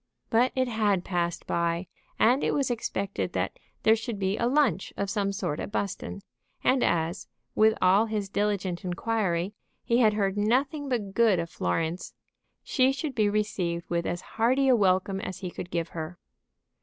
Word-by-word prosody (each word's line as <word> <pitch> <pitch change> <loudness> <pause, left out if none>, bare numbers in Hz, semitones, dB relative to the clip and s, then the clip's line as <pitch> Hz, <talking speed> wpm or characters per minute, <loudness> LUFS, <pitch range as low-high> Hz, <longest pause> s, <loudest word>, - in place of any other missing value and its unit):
But 240 +3 +4
it 260 -1 +1
had 210 -6 +1
passed 175 -2 -1
by, 170 +1 0 0.3
and 250 +5 +4
it - - +1
was 275 -3 +1
expected 200 -4 -2
that - - -2 0.2
there 220 - +6
should 225 -1 -4
be 195 0 0
a 235 +2 0
lunch 250 - +2
of 200 -1 -1
some 200 -2 0
sort 180 -6 -3
at - - -5
Buston; 200 -1 -3 0.4
and 255 -1 +3
as, 170 +2 0 0.3
with 220 0 +4
all 195 +5 +5
his 210 -2 -2
diligent 195 -3 -1
inquiry, 185 -1 -1 0.3
he 235 +1 +2
had 215 -4 +4
heard 200 -1 0
nothing 270 +7 +1
but 210 -6 -2
good 225 -3 +4
of 170 -1 -3
Florence, 160 - -2 0.5
she 260 -1 +3
should 280 +1 -3
be 215 -4 +2
received 185 -5 -1
with 170 0 0
as 175 - -2
hearty 255 +5 +1
a 255 - +6
welcome 190 -1 +2
as 185 - -6
he 180 -2 -4
could 175 - -7
give 170 -1 -2
her. 165 +1 -6
205 Hz, 175 wpm, -27 LUFS, 180-230 Hz, 0.5 s, there